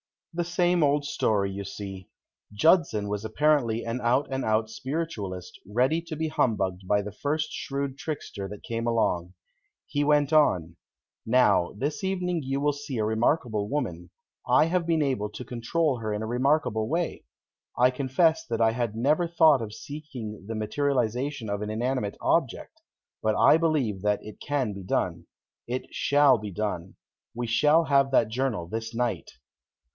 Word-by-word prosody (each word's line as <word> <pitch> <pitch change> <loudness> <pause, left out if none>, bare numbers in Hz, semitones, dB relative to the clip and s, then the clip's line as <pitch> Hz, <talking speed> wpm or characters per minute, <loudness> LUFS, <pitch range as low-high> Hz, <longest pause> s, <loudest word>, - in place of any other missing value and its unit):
The 175 +1 -1
same 175 0 +2
old 145 0 +2
story 105 -9 0
you 100 +1 -5
see. 95 -2 -7 0.5
Judson 110 - +3
was 105 0 -3
apparently 120 -1 +1
an 115 +2 -2
out 125 +4 +2
and 130 0 -1
out 110 0 +1
Spiritualist, 110 - -5
ready 130 +10 +1
to 165 -2 -6
be 160 +1 -2
humbugged 95 -10 0
by 105 +1 +2
the 105 - -6
first 150 +8 -2
shrewd 140 -2 -4
trickster 115 -10 -5
that 105 +1 -10
came 115 0 -3
along. 90 -6 0 0.5
He 145 - -1
went 145 0 +3
on: 85 - +3 0.5
"Now, 115 -7 +3
this 145 - -3
evening 180 -3 -1
you 135 +1 -2
will 145 0 +2
see 145 -2 -6
a 110 - +1
remarkable 110 -1 0
woman; 90 - -3 0.4
I - - +5
have 175 0 0
been 165 -2 +2
able 125 -7 -1
to 115 +4 -8
control 130 +4 0
her 110 -2 -3
in 105 +1 -3
a - - -3
remarkable 125 -2 +1
way. 170 +5 -2 0.5
I 125 +1 +5
confess 140 +5 +2
that 115 -1 -2
I 110 0 +5
had 115 -2 -2
never 150 +9 +2
thought 160 -5 +5
of 105 -2 -5
seeking 130 -10 -8
the 115 - -4
materialization 125 +2 -1
of 100 0 -2
an 105 - -3
inanimate 115 -1 -2
object. - - 0 0.4
But 110 0 +1
I 155 - +6
believe 145 - 0
that 105 0 0
it 105 - -10
can 135 -7 -1
be 100 - -8
done. 90 - -2 0.4
It 125 +2 -4
shall 140 -4 +4
be 105 -1 -6
done. 95 -3 -4 0.4
We 120 0 -2
shall 150 +8 +4
have 140 -3 +3
that 115 -4 +3
journal 120 -7 -1
this 115 +4 -5
night." 120 -1 -1
125 Hz, 165 wpm, -27 LUFS, 105-145 Hz, 0.5 s, I